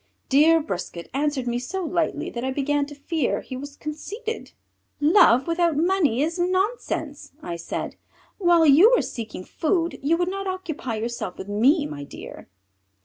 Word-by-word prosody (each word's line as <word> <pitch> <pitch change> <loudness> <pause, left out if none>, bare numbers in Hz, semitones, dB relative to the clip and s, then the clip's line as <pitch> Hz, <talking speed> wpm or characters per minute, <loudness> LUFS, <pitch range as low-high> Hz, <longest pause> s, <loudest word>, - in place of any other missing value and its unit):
Dear 310 +4 +5
Brisquet 175 - -6
answered 280 -2 0
me 240 0 -1
so 375 +10 -4
lightly 335 0 -1
that 235 - -5
I 260 - -1
began 285 +1 0
to 290 - -10
fear 290 0 -1
he 260 - -8
was 280 +2 -8
conceited. 415 +11 -6 0.5
"Love 290 - +5
without 335 -2 +1
money 315 -7 +2
is 330 +3 -2
nonsense," 355 - -1
I 170 - -4
said. 170 - -5 0.4
"While 345 -3 +5
you 320 - +7
were - - +1
seeking 220 -6 -6
food 335 - -1
you 310 +5 +2
would 350 0 0
not 390 +1 -4
occupy 335 -10 -4
yourself 230 -3 -4
with 190 - -8
me, 270 +10 +3
my 145 - -6
dear." 140 - -10
295 Hz, 160 wpm, -24 LUFS, 255-345 Hz, 0.5 s, you